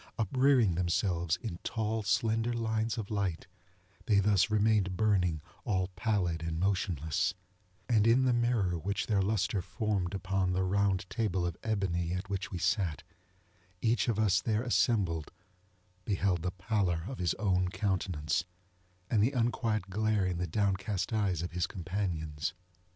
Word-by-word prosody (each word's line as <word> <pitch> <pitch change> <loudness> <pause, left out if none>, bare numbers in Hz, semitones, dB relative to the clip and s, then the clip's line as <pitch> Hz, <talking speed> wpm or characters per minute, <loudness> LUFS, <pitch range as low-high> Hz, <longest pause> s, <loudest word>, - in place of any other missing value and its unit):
Uprearing 125 -1 +3
themselves 85 -1 0
in 90 -7 -5
tall 110 0 -1
slender 110 +4 +1
lines 110 -1 -1
of 110 -2 -5
light, 100 -5 -1 0.6
they 105 -2 +4
thus 100 0 +3
remained 105 -3 +2
burning 90 -8 +2 0.2
all 95 -2 0
pallid 95 -5 -1
and 80 0 -3
motionless; 90 -3 0 0.5
and 110 -3 +3
in 125 +3 +5
the 125 - +3
mirror 115 -8 +1
which 100 +5 -2
their 105 -3 +2
lustre 105 0 0
formed 95 0 -2
upon 95 -1 0
the 95 +1 +1
round 95 0 +1
table 95 -6 -1
of 85 -2 -2
ebony 90 -6 -1
at 95 +2 -4
which 100 +1 -2
we 90 - -5
sat, 85 -2 0 0.8
each 115 +4 +1
of 115 -3 +1
us 105 -4 +3
there 110 0 0
assembled 100 - +1 0.7
beheld 95 -3 0
the 90 - -1
pallor 90 -2 -1
of 130 - -6
his 90 -3 +1
own 90 -3 +1
countenance, 90 -6 -1 0.6
and 105 0 +2
the 120 +7 +2
unquiet 115 -5 0
glare 110 0 +1
in 90 -2 -1
the 90 - -1
downcast 100 +2 -1
eyes 95 -6 0
of 90 - -4
his 90 +1 -1
companions. 85 -4 -3
95 Hz, 150 wpm, -31 LUFS, 90-110 Hz, 0.8 s, in